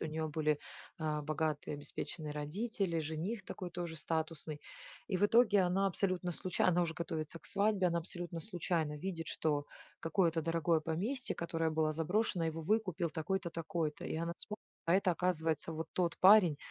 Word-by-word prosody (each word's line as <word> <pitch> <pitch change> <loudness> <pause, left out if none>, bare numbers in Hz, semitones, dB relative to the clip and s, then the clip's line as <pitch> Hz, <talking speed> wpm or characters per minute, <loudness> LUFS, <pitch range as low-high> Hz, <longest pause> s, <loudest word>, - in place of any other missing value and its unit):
у - - -2
нее 160 0 -2
были, 150 -1 +1 0.4
а, 155 -1 -1
богатые 155 0 -1
обеспеченные 150 +1 -5
родители, 170 +4 -1
жених 165 +8 -3
такой 185 - -5
тоже 170 -2 -4
статусный. 160 -2 -2 0.5
И 185 - 0
в 205 - +4
итоге 215 -2 +5
она 185 +2 +3
абсолютно 185 -1 0
случай 185 +1 -2
она 180 -1 +4
уже 165 -1 -1
готовится 165 -2 -4
к - - -25
свадьбе, 200 -2 +2
она 170 0 +1
абсолютно 170 0 -5
случайно 165 -4 -1
видит, 165 0 -4
что 145 -2 0 0.3
какое-то 165 0 +2
дорогое 165 0 +2
поместье, 200 - -2
которое 165 -1 0
было 155 0 +1
заброшено, 180 +3 +1
его 160 0 -3
выкупил 185 -4 +1
такой-то, 175 +3 -2
такой-то. 165 -2 -2
И - - -2
она 170 +1 -1
вспоминает, 210 0 -6 0.2
а 170 - +4
это 190 -1 +4
оказывается 165 -3 0
вот 160 0 -4
тот 175 -2 +1
парень, 190 -5 +8
165 Hz, 165 wpm, -35 LUFS, 160-185 Hz, 0.5 s, парень